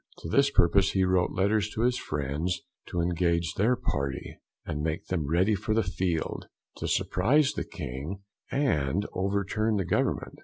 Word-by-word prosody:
To 80 - -4
this 140 +10 +4
purpose 95 -4 +4
he 95 - +3
wrote 90 -1 +2
letters 100 +2 +1
to 110 - -1
his 125 0 +2
friends, 75 +5 -2 0.3
to 90 - -1
engage 85 -1 +1
their 115 +6 +2
Party, 70 - -3 0.3
and 75 - -3
make 80 +1 -2
them 80 -6 -2
ready 90 +6 +3
for 110 +2 -1
the 115 - +3
Field, 90 -3 -2 0.3
to - - -3
surprise 130 +10 +2
the - - -2
King, 75 +11 -6 0.3
and 100 - +1
overturn 100 +3 0
the 95 -3 0
Government. 90 - -1
95 Hz, 160 wpm, -28 LUFS, 80-105 Hz, 0.3 s, this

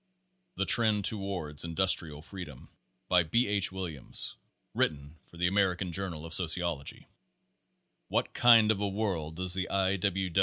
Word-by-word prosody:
THE - - -1
TREND 110 -6 +3
TOWARD 95 -8 -2
INDUSTRIAL 85 -3 0
FREEDOM 85 -8 -10 0.4
By 90 -1 +4
B. 115 +10 +1
H. 100 -2 +1
Williams. 90 -8 -5 0.4
(Written 75 +1 -2
for 85 - -16
the 90 - 0
American 95 -1 +1
Journal 85 -3 -4
of 80 - -7
Sociology.) 85 -4 0 1.0
"What - - -1
kind 115 -3 +6
of 105 - -1
a 100 - 0
world 95 -7 -2
does 90 +1 -1
the 95 0 -2
I. 95 0 +1
90 Hz, 140 wpm, -30 LUFS, 80-100 Hz, 1.0 s, kind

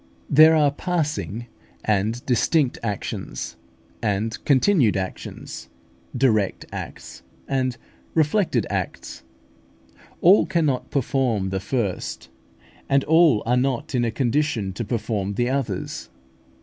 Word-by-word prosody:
There 155 +3 +8
are 150 -2 +4
passing 150 - -2 0.4
and 110 +3 0
distinct 130 +2 +2
actions, 105 -4 -4 0.5
and 110 +1 -1
continued 135 - +4
actions; 95 -1 -6 0.5
direct 110 -7 +1
acts - - -8 0.3
and 130 -3 0 0.4
reflected 165 +5 +2
acts. - - -4 1.0
All 185 +4 +6
cannot 155 -8 0
perform 120 -7 0
the 95 - -1
first, 105 -1 -3 0.6
and 140 0 +3
all 160 -7 +4
are 120 +2 +2
not 125 -1 -1
in 125 -2 +2
a 115 - +1
condition 120 -5 0
to 110 - -4
perform 105 -3 -2
the 120 +3 +1
others. 125 -9 -3
125 Hz, 110 wpm, -23 LUFS, 110-145 Hz, 1.0 s, There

